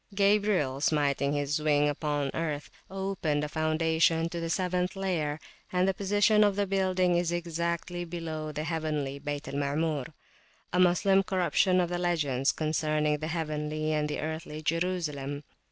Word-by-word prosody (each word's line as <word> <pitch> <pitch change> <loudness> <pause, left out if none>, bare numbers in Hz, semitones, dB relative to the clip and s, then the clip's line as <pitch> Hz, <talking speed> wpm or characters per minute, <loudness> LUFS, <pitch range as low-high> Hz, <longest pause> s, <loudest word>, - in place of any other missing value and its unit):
Gabriel, 200 -9 +2
smiting 145 -2 +1
his 145 +1 -1
wing 150 -1 +3
upon 145 -1 -1
earth, 150 -3 -3 0.2
opened 190 -6 -1
a - - -1
foundation 160 +1 +2
to 170 0 -5
the 165 0 -3
seventh 180 +1 0
layer, 165 -6 -1 0.3
and 180 +1 +2
the 195 - +2
position 205 +2 +3
of 205 -2 +3
the 205 0 +1
building 185 -2 +1
is 175 -1 0
exactly 170 +1 -2
below 165 -3 -5
the 150 +1 -4
heavenly 155 -4 -2
Bayt 145 0 -4
al - - -6
Maamur,a 145 +4 -3
Moslem 185 +2 +4
corruption 185 0 +2
of 175 -1 +1
the 175 0 -2
legends 150 -7 +1
concerning 155 -1 0
the 155 - -3
heavenly 155 -1 -2
and 150 0 0
the 150 - -3
earthly 155 0 -5
Jerusalem. 150 -4 -2
160 Hz, 150 wpm, -29 LUFS, 150-180 Hz, 0.3 s, Moslem